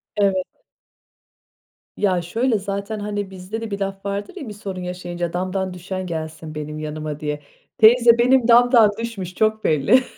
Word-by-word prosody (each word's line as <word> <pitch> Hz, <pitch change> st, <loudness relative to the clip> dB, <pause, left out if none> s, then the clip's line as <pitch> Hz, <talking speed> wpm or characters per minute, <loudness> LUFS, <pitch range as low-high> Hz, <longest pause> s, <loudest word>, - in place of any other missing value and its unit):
Evet. 195 Hz, -3 st, +1 dB, 1.5 s
Ya, 185 Hz, -4 st, +2 dB
şöyle 225 Hz, +8 st, 0 dB
zaten, 200 Hz, +2 st, -4 dB
hani, 205 Hz, -1 st, -3 dB
bizde 190 Hz, +4 st, -6 dB
de 225 Hz, -2 st, -5 dB
bir 200 Hz, -, -3 dB
laf 195 Hz, 0 st, -4 dB
vardır 200 Hz, -, -4 dB
ya, 295 Hz, -10 st, -7 dB
bir -, -, -6 dB
sorun 195 Hz, -3 st, -6 dB
yaşayınca 175 Hz, -1 st, -4 dB
"Damdan 185 Hz, +1 st, -2 dB
düşen 185 Hz, +1 st, -5 dB
gelsin 160 Hz, -1 st, -6 dB
benim 150 Hz, 0 st, -5 dB
yanıma" 155 Hz, -1 st, -5 dB
diye. 150 Hz, -1 st, -3 dB, 0.4 s
Teyze, 235 Hz, +1 st, +7 dB
benim 250 Hz, 0 st, +4 dB
damdan 240 Hz, -2 st, +6 dB
düşmüş 200 Hz, -6 st, -5 dB
çok 220 Hz, 0 st, +1 dB
belli 160 Hz, -, +4 dB
195 Hz, 155 wpm, -21 LUFS, 175-220 Hz, 1.5 s, Teyze